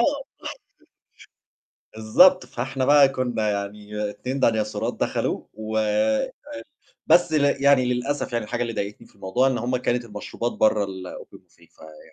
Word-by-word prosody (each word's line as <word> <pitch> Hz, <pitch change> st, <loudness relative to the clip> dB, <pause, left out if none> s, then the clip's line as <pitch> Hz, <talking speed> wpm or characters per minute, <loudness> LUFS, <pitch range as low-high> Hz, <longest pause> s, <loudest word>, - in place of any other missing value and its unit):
بالضبط. -, -, 0 dB, 1.7 s
بالضبط 180 Hz, +13 st, +5 dB
فإحنا 130 Hz, +2 st, -3 dB
بقى 145 Hz, -1 st, +6 dB
كنّا 120 Hz, -5 st, -1 dB
يعني 105 Hz, +1 st, -4 dB
2 130 Hz, +6 st, -5 dB
ديناصورات 110 Hz, -3 st, 0 dB
دخلوا -, -, -2 dB
و 110 Hz, +1 st, -4 dB
ال 110 Hz, 0 st, +1 dB, 0.8 s
بس 175 Hz, -2 st, +4 dB
ل 140 Hz, -2 st, +2 dB
يعني 140 Hz, -3 st, +5 dB
للأسف 135 Hz, +2 st, -3 dB
يعني 115 Hz, -2 st, -1 dB
الحاجة 120 Hz, +3 st, -4 dB
اللي 115 Hz, -1 st, -2 dB
ضايقتني 100 Hz, 0 st, -5 dB
في -, -, -26 dB
الموضوع 100 Hz, +7 st, +1 dB
إن 130 Hz, -2 st, 0 dB
هُم 125 Hz, +2 st, -1 dB
كانت 120 Hz, -1 st, -1 dB
المشروبات 110 Hz, +2 st, -5 dB
برّه 105 Hz, -1 st, +2 dB
الOpen 95 Hz, -1 st, -9 dB
buffet -, -, -25 dB
فيعني 80 Hz, -1 st, -15 dB
115 Hz, 145 wpm, -23 LUFS, 105-130 Hz, 1.7 s, بقى